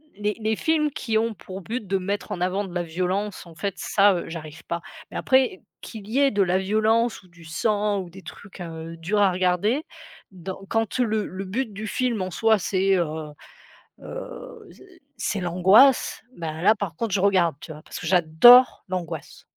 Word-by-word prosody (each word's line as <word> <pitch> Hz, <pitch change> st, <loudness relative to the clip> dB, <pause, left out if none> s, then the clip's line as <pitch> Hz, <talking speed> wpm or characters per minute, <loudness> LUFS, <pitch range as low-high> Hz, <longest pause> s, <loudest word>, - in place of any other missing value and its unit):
les 210 Hz, 0 st, -2 dB
les 220 Hz, 0 st, 0 dB
films 305 Hz, +3 st, +1 dB
qui 225 Hz, -5 st, -1 dB
ont 225 Hz, +1 st, 0 dB
pour 190 Hz, 0 st, -9 dB
but 225 Hz, +3 st, -5 dB
de 195 Hz, +1 st, +1 dB
mettre 200 Hz, +2 st, -4 dB
en -, -, -3 dB
avant 190 Hz, +3 st, 0 dB
de 185 Hz, -, -10 dB
la 175 Hz, -, 0 dB
violence, 185 Hz, +5 st, -3 dB
en 165 Hz, -, -14 dB
fait 200 Hz, +4 st, -3 dB
ça, 200 Hz, 0 st, +3 dB
heu, 175 Hz, -, -4 dB
j'arrive 155 Hz, -2 st, -8 dB
pas 170 Hz, 0 st, -3 dB, 0.3 s
mais -, -, -6 dB
après 260 Hz, -7 st, +2 dB, 0.2 s
qu'il 215 Hz, -3 st, -9 dB
y 250 Hz, +5 st, +1 dB
ait 280 Hz, -1 st, +5 dB
de 205 Hz, -1 st, +2 dB
la 180 Hz, 0 st, +1 dB
violence 220 Hz, +4 st, +1 dB
ou 185 Hz, -, -21 dB
du 170 Hz, -1 st, -17 dB
sang 205 Hz, +5 st, 0 dB
ou 180 Hz, -, -9 dB
des 190 Hz, +2 st, -12 dB
trucs, 195 Hz, 0 st, -12 dB
heu, 165 Hz, -1 st, -7 dB
durs 195 Hz, +6 st, 0 dB
à 195 Hz, -2 st, +4 dB
regarder 185 Hz, -, +1 dB, 0.5 s
donc 190 Hz, +1 st, -8 dB
quand 225 Hz, +2 st, -1 dB
le 220 Hz, -3 st, +1 dB
le 190 Hz, +2 st, -6 dB
but 225 Hz, +5 st, -3 dB
du 215 Hz, +2 st, -6 dB
film 240 Hz, -2 st, -1 dB
en 185 Hz, -, -2 dB
soi 220 Hz, +4 st, +3 dB
c'est, 195 Hz, +1 st, +1 dB
heu, 170 Hz, -2 st, +1 dB, 1.0 s
heu, -, -, -9 dB
c -, -, -18 dB, 0.4 s
c'est 205 Hz, -, -2 dB
l'angoisse 190 Hz, +9 st, +4 dB
bah 160 Hz, -1 st, -5 dB
là, 215 Hz, +4 st, +6 dB
par 200 Hz, -6 st, -5 dB
contre 230 Hz, 0 st, -3 dB
je 195 Hz, -, +1 dB
regarde 185 Hz, -5 st, +3 dB
tu -, -, -11 dB
vois? 155 Hz, 0 st, -12 dB
Parce -, -, -8 dB
que -, -, -6 dB
j'adore 185 Hz, +9 st, +6 dB
l'angoisse. 180 Hz, -3 st, -6 dB
195 Hz, 200 wpm, -24 LUFS, 180-220 Hz, 1.0 s, là